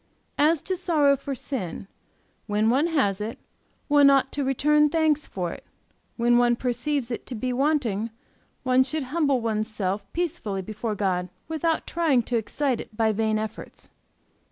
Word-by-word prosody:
As 305 +1 +3
to 375 - -1
sorrow 315 -6 +3
for 275 0 -5
sin, 225 - -5 0.6
when 210 +1 +2
one 280 +6 +3
has 210 - +1
it, 220 +2 -4 0.5
one 290 -1 +6
ought 270 -1 +3
to 285 - -2
return 300 +3 +3
thanks 310 -2 +1
for 180 -3 -3
it; - - -11 0.5
when 240 0 +4
one 240 0 +4
perceives 250 +2 -2
it 235 - -5
to 250 - -5
be 250 +3 -2
wanting, 245 -6 0 0.5
one 255 0 +4
should 285 +3 -1
humble 285 -6 +2
one's 215 -1 -1
self 200 -2 -3
peacefully 305 - -2
before 215 +2 -4
God 180 -3 -1 0.2
without 320 0 -1
trying 310 -8 +2
to 240 +1 -1
excite 250 +3 -1
it 215 - -13
by 220 -1 +3
vain 215 0 0
efforts. 215 0 -7
255 Hz, 160 wpm, -25 LUFS, 215-295 Hz, 0.6 s, one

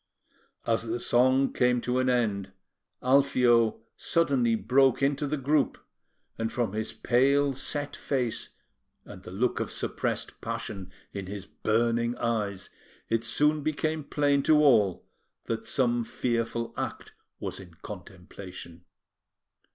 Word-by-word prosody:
As 115 0 0
the 115 +2 -2
song 130 +3 +3
came 125 0 +2
to 125 +1 0
an 130 0 +2
end, 105 -6 0 0.5
Alfio 125 -4 +4
suddenly 135 -9 +1
broke 130 +5 +3
into 140 +1 +1
the 150 +2 -1
group; 145 +2 +1 0.6
and 115 0 -1
from 120 -6 -1
his 110 0 -2
pale, 140 +3 +2
set 145 +2 -3
face, 125 -5 -2 0.6
and - - -11
the - - -10
look 110 +7 0
of - - -3
suppressed - - -3
passion 95 -2 -5 0.2
in 100 -2 -5
his 100 0 -6
burning 115 +3 0
eyes, 105 -5 -2 0.4
it 115 0 +1
soon 150 +7 +2
became 155 +1 -1
plain 145 -1 +1
to 155 +2 +4
all 115 - +4 0.4
that 115 - -4
some 120 -4 +2
fearful 115 0 -2
act - - -5 0.3
was - - -5
in 90 -3 -13
contemplation. 90 -3 -10
120 Hz, 130 wpm, -28 LUFS, 110-135 Hz, 0.6 s, Alfio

